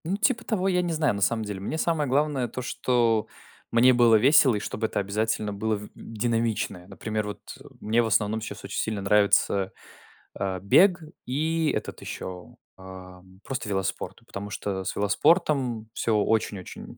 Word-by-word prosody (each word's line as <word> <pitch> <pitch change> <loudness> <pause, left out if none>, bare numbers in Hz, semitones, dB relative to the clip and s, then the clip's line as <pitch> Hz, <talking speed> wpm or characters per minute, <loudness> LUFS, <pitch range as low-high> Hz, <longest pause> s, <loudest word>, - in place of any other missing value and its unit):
Ну 185 +5 -1
типа 225 +1 +1
того, 195 -5 -1
я 180 -2 +2
не 175 -2 -2
знаю, 155 -6 +1
на 100 - -5
самом 110 +2 +1
деле. 105 -2 -5
Мне 100 +11 -4
самое 160 -4 0
главное 140 -2 +1
то, 125 - -6
что 120 -3 +1 0.4
мне 125 +2 +6
было 120 -2 +5
весело 130 +2 +5
и - - -1
чтобы 110 +2 -3
это - - -2
обязательно 105 +1 -1
было 110 +2 -1
в 105 0 -8
динамичное. 115 -5 -2
Например, 105 +2 -4
вот, 105 - -6 0.2
э, - - -14 0.2
мне 115 +3 +2
в 115 - 0
основном 110 +1 +1
сейчас 110 - -7
очень - - -4
сильно 110 -2 -2
нравится, 100 -1 +3 0.6
а, 95 -1 -2
бег 175 - +4 0.2
и 160 +4 0
этот - - -5
еще, 90 -1 -7 0.2
а, 95 -1 -11 0.2
просто 130 -5 -4
велоспорт, 95 -1 -3
потому 100 +1 -6
что 95 -1 -3
с - - -3
велоспортом 125 - +1
всё 115 -2 0
очень-очень, 105 -3 -2
110 Hz, 170 wpm, -26 LUFS, 100-135 Hz, 0.6 s, мне